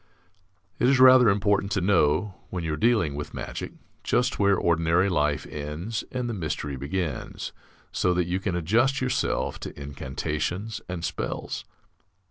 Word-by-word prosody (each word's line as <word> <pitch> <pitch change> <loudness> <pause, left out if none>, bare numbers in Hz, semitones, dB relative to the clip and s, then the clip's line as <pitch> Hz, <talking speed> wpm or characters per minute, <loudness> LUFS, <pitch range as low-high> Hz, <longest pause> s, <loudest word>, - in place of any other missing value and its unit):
It 125 - +4
is 135 -1 +4
rather 130 -2 +8
important 100 0 +1
to 100 - +1
know, 90 0 +2 0.2
when 90 -2 -4
you 80 -1 -1
are - - 0
dealing 105 -5 +2
with 75 +1 -6
magic, - - -5 0.3
just 125 +1 +1
where 100 -1 +4
ordinary 85 +3 +2
life 75 -5 +1
ends 75 +9 -4
and 125 -1 -2
the 120 - -2
mystery 75 -6 -3
begins, 75 +2 -4 0.4
so 90 - +1
that 90 -1 +1
you 90 +2 -1
can 95 -2 -2
adjust 115 +11 +2
yourself 130 -1 -1
to - - -8
incantations 75 +9 -3
and 85 -2 -3
spells. - - -4
90 Hz, 150 wpm, -26 LUFS, 75-110 Hz, 0.4 s, rather